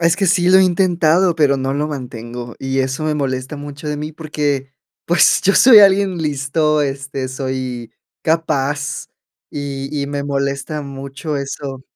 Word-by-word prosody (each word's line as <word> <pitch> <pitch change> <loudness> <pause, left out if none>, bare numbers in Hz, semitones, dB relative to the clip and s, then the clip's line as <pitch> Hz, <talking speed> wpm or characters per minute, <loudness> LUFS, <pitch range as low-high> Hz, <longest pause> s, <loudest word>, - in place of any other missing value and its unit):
es 165 0 +3
que 195 - +1
sí 180 -1 +3
lo 190 - +7
he 190 - +6
intentado, 175 -1 +2
pero 145 -4 +3
no 135 +1 -2
lo 150 +1 -1
mantengo. 120 -3 -7
Y 135 0 -1
eso 130 +3 -2
me 155 - 0
molesta 135 0 -3
mucho 145 +1 -7
de 150 - -2
mí, 150 +1 -5
porque, 145 -4 -3 0.3
pues, 175 +1 +4
yo 195 - +3
soy 245 -4 +8
alguien 195 -2 +4
listo, 150 +1 0
este, 135 -1 -4
soy 130 -2 -4 0.3
capaz, 145 -3 -1 0.4
y 140 -1 -5
y 140 - -3
me 145 0 -3
molesta 140 +1 -2
mucho 140 +2 -6
eso 135 -1 -5
145 Hz, 160 wpm, -18 LUFS, 135-160 Hz, 0.4 s, soy